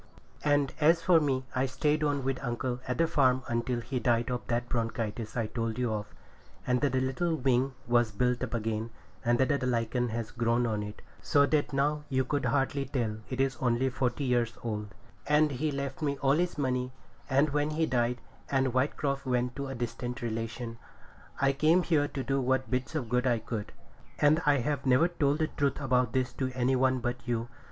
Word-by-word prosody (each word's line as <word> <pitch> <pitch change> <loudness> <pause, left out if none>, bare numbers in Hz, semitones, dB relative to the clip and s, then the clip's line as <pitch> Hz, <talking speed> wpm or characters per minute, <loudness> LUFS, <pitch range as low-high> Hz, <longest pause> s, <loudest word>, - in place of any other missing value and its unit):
And 145 -2 +2
as 165 +2 +4
for 175 -2 +6
me, 135 -4 0
I 130 +1 +1
stayed 150 +4 0
on 145 -2 0
with 135 0 -2
uncle 125 0 -2
at 125 - -1
the 165 - +4
farm 130 -5 +3
until 120 +1 -1
he 130 +2 -3
died 120 0 +1
of 125 - -1
that 120 0 -1
bronchitis 115 -1 -3
I 115 - +1
told 115 0 -3
you 125 -3 0
of, 105 0 -3 0.6
and 125 0 +1
the 145 - +3
little 130 +6 0
wing 130 -1 +1
was 120 -2 +3
built 125 +3 0
up - - -2
again, 110 0 -2 0.3
and 120 0 +3
the 140 +1 +1
lichen 120 0 0
has 115 0 -4
grown 120 0 +1
on 110 -2 -1
it, 105 0 -8 0.2
so 140 -1 +4
that 145 +1 +1
now 145 +2 +1
you 130 -1 +1
could 145 +2 -1
hardly 135 0 +1
tell 120 -6 -2
it 130 - -4
is 135 -2 +1
only 125 +1 +1
forty 125 +2 -1
years 120 -3 +1
old; 105 -2 -3 0.4
and 150 0 +4
he 150 +4 -1
left 140 +1 -4
me 140 -2 0
all 135 -1 +2
his 175 +2 0
money, 125 -2 -1 0.4
and 140 +3 +3
when 145 +1 +1
he 160 +1 +1
died, 125 -3 0 0.3
and 135 -1 +2
Whitecroft 135 +1 0
went 125 0 0
to 140 0 -3
a 135 - -5
distant 120 +1 -4
relation, 115 +1 -4 0.6
I 135 0 +3
came 155 +6 +4
here 150 -4 +2
to 135 - -4
do 135 0 0
what 130 0 0
bits 130 +4 -2
of 135 -7 -2
good 125 +2 +1
I 120 -2 +3
could. 110 -2 -5 0.5
And 150 +3 +4
I 145 -1 +5
have 145 +1 -1
never 130 +6 +4
told 145 -4 +1
the 155 -1 +1
truth 140 -2 -1
about 125 -3 +1
this 130 -1 0
to 130 0 0
any 130 +1 +2
one 130 0 +2
but 120 0 -1
you. 120 0 -1
130 Hz, 200 wpm, -30 LUFS, 120-140 Hz, 0.6 s, for